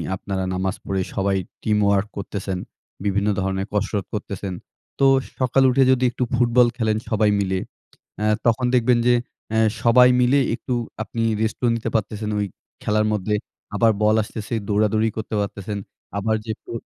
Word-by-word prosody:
আপনারা 95 Hz, 0 st, -3 dB
নামাজ 95 Hz, +1 st, -1 dB
পড়ে 95 Hz, -1 st, -1 dB
সবাই 100 Hz, -1 st, +1 dB, 0.3 s
teamwork 105 Hz, -1 st, +2 dB
করতেছেন, 95 Hz, -1 st, -4 dB, 0.5 s
বিভিন্ন 100 Hz, +1 st, +1 dB
ধরনের 95 Hz, 0 st, -1 dB
কসরত 105 Hz, -1 st, -1 dB
করতেছেন। 100 Hz, -2 st, -4 dB, 0.5 s
তো 135 Hz, -, +4 dB, 0.3 s
সকালে 130 Hz, +1 st, +3 dB
উঠে 135 Hz, +2 st, +4 dB
যদি 130 Hz, -1 st, +2 dB
একটু 125 Hz, -, -2 dB
ফুটবল 120 Hz, 0 st, +4 dB
খেলেন 110 Hz, -3 st, +1 dB
সবাই 110 Hz, -1 st, +3 dB
মিলে 95 Hz, -1 st, 0 dB, 0.6 s
অ্যা 105 Hz, -, 0 dB, 0.2 s
তখন 120 Hz, +2 st, +2 dB
দেখবেন 125 Hz, 0 st, +4 dB
যে, 125 Hz, -, +6 dB, 0.4 s
অ্যা 110 Hz, -, +2 dB, 0.2 s
সবাই 125 Hz, +2 st, +7 dB
মিলে 125 Hz, +3 st, +4 dB, 0.2 s
একটু 125 Hz, +1 st, -4 dB, 0.3 s
আপনি 115 Hz, 0 st, -3 dB, 0.2 s
rest 110 Hz, -1 st, -1 dB
ও -, -, +4 dB
নিতে 115 Hz, -, -3 dB
পারতেছেন 105 Hz, 0 st, -1 dB, 0.5 s
খেলার 105 Hz, 0 st, +2 dB
মধ্যে 105 Hz, 0 st, 0 dB, 0.4 s
আবার 115 Hz, +2 st, +4 dB
বল 105 Hz, +1 st, +4 dB
আসতেছে 105 Hz, 0 st, -7 dB
দৌড়াদৌড়ি 110 Hz, +1 st, +2 dB
করতে 110 Hz, 0 st, -3 dB
পারতেছেন। 100 Hz, 0 st, -4 dB, 0.4 s
আবার 110 Hz, +2 st, +1 dB
যেহেতু 110 Hz, -1 st, -6 dB
110 Hz, 150 wpm, -22 LUFS, 100-115 Hz, 0.6 s, সবাই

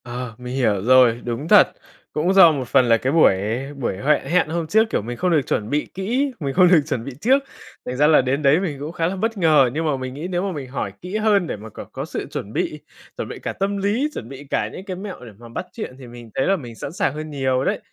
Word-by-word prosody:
Ờ, 120 Hz, -1 st, -6 dB
mình 125 Hz, 0 st, -6 dB
hiểu 110 Hz, -7 st, +1 dB
rồi, 125 Hz, -1 st, +5 dB
đúng 120 Hz, +5 st, -3 dB
thật, 205 Hz, +1 st, +7 dB, 0.5 s
cũng 170 Hz, +5 st, +1 dB
do 190 Hz, -4 st, +8 dB
một 135 Hz, -5 st, -3 dB
phần 125 Hz, -, +4 dB
là 115 Hz, -, +6 dB
cái 130 Hz, +5 st, -1 dB
buổi 160 Hz, -11 st, +5 dB, 0.4 s
buổi 125 Hz, -8 st, -3 dB
huệ 145 Hz, +7 st, +2 dB
hẹn 180 Hz, 0 st, +1 dB
hôm 165 Hz, 0 st, -2 dB
trước, 220 Hz, +6 st, +3 dB
kiểu, -, -, 0 dB
mình 120 Hz, +3 st, -6 dB
không 180 Hz, -1 st, 0 dB
được 155 Hz, -3 st, +4 dB
chuẩn 105 Hz, 0 st, -1 dB
bị 150 Hz, +2 st, 0 dB
kỹ, 245 Hz, +9 st, -1 dB
mình 140 Hz, -4 st, -3 dB
không 180 Hz, +2 st, +6 dB
được 175 Hz, -3 st, +6 dB
chuẩn 125 Hz, -7 st, -2 dB
bị 140 Hz, -, -5 dB
trước, 270 Hz, +4 st, +3 dB, 0.4 s
thành 125 Hz, -, -4 dB
ra 150 Hz, +2 st, +5 dB
là 155 Hz, -3 st, +6 dB
đến 130 Hz, +3 st, -1 dB
đấy 145 Hz, +3 st, +4 dB
mình 160 Hz, -8 st, -3 dB
cũng 150 Hz, +3 st, -5 dB
khá 165 Hz, -1 st, -1 dB
là 185 Hz, -, -2 dB
bất 225 Hz, +3 st, -2 dB
ngờ. 155 Hz, -7 st, +4 dB
Nhưng 160 Hz, +2 st, -2 dB
mà 150 Hz, -3 st, 0 dB
mình 130 Hz, 0 st, -5 dB
nghĩ 150 Hz, +6 st, -5 dB
nếu 180 Hz, -1 st, -1 dB
mà 200 Hz, -, -2 dB
mình 145 Hz, -6 st, -6 dB
hỏi 135 Hz, -, -4 dB
kỹ 180 Hz, +4 st, -4 dB
hơn 210 Hz, -4 st, +2 dB
để -, -, -3 dB
mà 110 Hz, +2 st, -10 dB
c -, -, -24 dB, 0.2 s
có -, -, -4 dB
sự -, -, -5 dB
chuẩn -, -, -6 dB
bị, -, -, -2 dB, 0.4 s
chuẩn -, -, -4 dB
bị -, -, -7 dB
cả -, -, -4 dB
tâm 200 Hz, +2 st, -2 dB
lý, 210 Hz, +9 st, 0 dB
chuẩn 115 Hz, -, -7 dB
bị 135 Hz, +1 st, -9 dB
cả -, -, 0 dB
những 190 Hz, -, -8 dB
cái 190 Hz, -3 st, -5 dB
mẹo 190 Hz, -8 st, -8 dB
để 115 Hz, -, -10 dB
mà 120 Hz, +1 st, -13 dB
bắt 120 Hz, -, -5 dB
chuyện 215 Hz, -, -6 dB
thì 130 Hz, -, -10 dB
mình 120 Hz, -1 st, -11 dB
thấy 135 Hz, -, +1 dB
là 195 Hz, -, +3 dB
mình 120 Hz, -10 st, -8 dB
sẵn 140 Hz, -, -6 dB
sàng 140 Hz, -, 0 dB
hơn 155 Hz, +1 st, -6 dB
nhiều 130 Hz, -3 st, 0 dB
đấy. -, -, 0 dB
150 Hz, 280 wpm, -21 LUFS, 125-185 Hz, 0.5 s, do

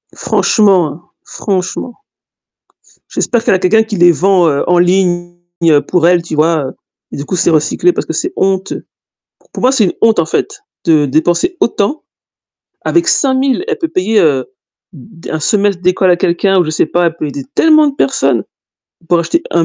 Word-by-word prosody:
Franchement, 180 Hz, -6 st, +1 dB
franchement. 195 Hz, +5 st, -4 dB, 1.2 s
J'espère 235 Hz, -2 st, -1 dB
qu'elle 200 Hz, -, +2 dB
a -, -, 0 dB
quelqu'un 190 Hz, +4 st, +3 dB
qui 220 Hz, -1 st, -4 dB
les 175 Hz, 0 st, +5 dB
vend 180 Hz, +1 st, +2 dB, 0.2 s
en 180 Hz, -, +3 dB
ligne 175 Hz, -1 st, +1 dB, 0.5 s
pour 175 Hz, -2 st, +2 dB
elle, 175 Hz, 0 st, +3 dB
tu 170 Hz, -2 st, -6 dB
vois? 155 Hz, -3 st, +1 dB, 0.4 s
Et -, -, -7 dB
du 140 Hz, -, -6 dB
coup, 170 Hz, -, -3 dB
c'est 175 Hz, -, +1 dB
recyclé 160 Hz, -, +1 dB
parce -, -, -4 dB
que -, -, -5 dB
c'est 360 Hz, -, -2 dB
honteux. 190 Hz, 0 st, -2 dB, 0.7 s
Pour -, -, -7 dB
moi, 255 Hz, -, +4 dB
c'est 265 Hz, -5 st, +2 dB
une 180 Hz, -, 0 dB
honte, 225 Hz, -3 st, +3 dB
en 165 Hz, -, +2 dB
fait, 405 Hz, -, -3 dB, 0.2 s
de 155 Hz, -4 st, +3 dB
dépenser 170 Hz, -, 0 dB
autant 235 Hz, +6 st, -1 dB, 0.8 s
avec 345 Hz, +1 st, 0 dB
5000, 270 Hz, -1 st, +1 dB
elle 450 Hz, -, -2 dB
peut 330 Hz, -, -2 dB
payer, 205 Hz, +1 st, +1 dB
heu, 140 Hz, -7 st, +1 dB, 0.5 s
d 165 Hz, +2 st, -14 dB
d -, -, -6 dB
1 155 Hz, -, -3 dB
semestre 200 Hz, 0 st, 0 dB
d'école 185 Hz, +1 st, +2 dB
à 175 Hz, -, +4 dB
quelqu'un 180 Hz, +3 st, +1 dB
ou -, -, +1 dB
je 155 Hz, -, -3 dB
sais 155 Hz, -, 0 dB
pas, 175 Hz, +1 st, 0 dB
elle 165 Hz, -1 st, -2 dB
peut 155 Hz, -, -4 dB
aider 140 Hz, -1 st, -6 dB
tellement 310 Hz, -1 st, +4 dB
de 280 Hz, -, -5 dB
personnes 270 Hz, -1 st, 0 dB, 0.7 s
pour 175 Hz, -, +3 dB
acheter 330 Hz, -, -1 dB
un 170 Hz, -1 st, +2 dB
180 Hz, 185 wpm, -13 LUFS, 170-225 Hz, 1.2 s, les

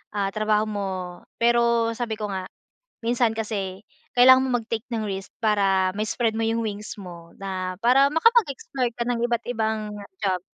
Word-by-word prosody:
ah, 200 Hz, -1 st, 0 dB
trabaho 215 Hz, 0 st, +1 dB
mo. 205 Hz, -2 st, -3 dB, 0.5 s
Pero 235 Hz, -1 st, +3 dB
sabi 230 Hz, -2 st, -3 dB
ko 210 Hz, -1 st, -4 dB
nga, 185 Hz, -1 st, -4 dB, 0.6 s
minsan 235 Hz, 0 st, +2 dB
kasi 200 Hz, -4 st, -3 dB, 0.3 s
kailangan 260 Hz, +1 st, +7 dB
mo 245 Hz, -2 st, +1 dB
mag-take 225 Hz, +1 st, -4 dB
ng 225 Hz, -1 st, -1 dB
risk 195 Hz, 0 st, -5 dB
para 195 Hz, -3 st, +3 dB
ma 215 Hz, -, +1 dB
spread 225 Hz, 0 st, 0 dB
mo 225 Hz, -, 0 dB
'yung 230 Hz, +1 st, 0 dB
wings 210 Hz, 0 st, -5 dB
mo 170 Hz, -3 st, -11 dB
na 185 Hz, -2 st, -4 dB
para 265 Hz, +4 st, +5 dB
makapag-explore 295 Hz, -, +2 dB
ka 235 Hz, -, -2 dB
ng 240 Hz, -1 st, 0 dB
iba't-ibang 220 Hz, -3 st, -1 dB, 0.3 s
job, 185 Hz, -3 st, +1 dB
220 Hz, 160 wpm, -24 LUFS, 200-235 Hz, 0.6 s, kailangan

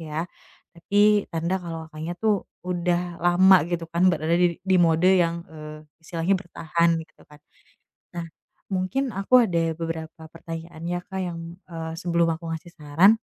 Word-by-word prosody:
ya, 160 Hz, +1 st, -3 dB, 0.5 s
tapi 205 Hz, +3 st, +3 dB
tanda 170 Hz, +3 st, 0 dB
kalau 165 Hz, -2 st, -7 dB
Kakaknya 160 Hz, +3 st, -5 dB
tuh, 210 Hz, -1 st, 0 dB, 0.2 s
udah 175 Hz, -1 st, -1 dB
lama 185 Hz, +2 st, +6 dB
gitu 170 Hz, -1 st, -2 dB
kan, 170 Hz, +3 st, +2 dB
berada 160 Hz, +1 st, -1 dB
di 175 Hz, -1 st, +2 dB
di 190 Hz, 0 st, +2 dB
mode 165 Hz, +2 st, +4 dB
yang, 170 Hz, -1 st, +1 dB
e 160 Hz, -, -14 dB, 0.4 s
istilahnya 170 Hz, +3 st, 0 dB
bertahan 170 Hz, -2 st, 0 dB
gitu 155 Hz, -, -31 dB
kan. 150 Hz, -, -15 dB, 0.8 s
Nah, 170 Hz, -, -3 dB, 0.5 s
mungkin 240 Hz, +9 st, -1 dB
aku 230 Hz, +5 st, +4 dB
ada 165 Hz, -3 st, 0 dB
beberapa 165 Hz, -1 st, -5 dB
pertanyaan 165 Hz, 0 st, -8 dB
ya 175 Hz, 0 st, -2 dB
Kak, 190 Hz, -, -5 dB
yang, 175 Hz, -2 st, -4 dB, 0.3 s
e 170 Hz, -, -9 dB, 0.2 s
sebelum 170 Hz, -1 st, +1 dB
aku 165 Hz, 0 st, -7 dB
ngasih 165 Hz, +1 st, -6 dB
saran. 165 Hz, +9 st, +4 dB
170 Hz, 155 wpm, -25 LUFS, 165-185 Hz, 0.8 s, lama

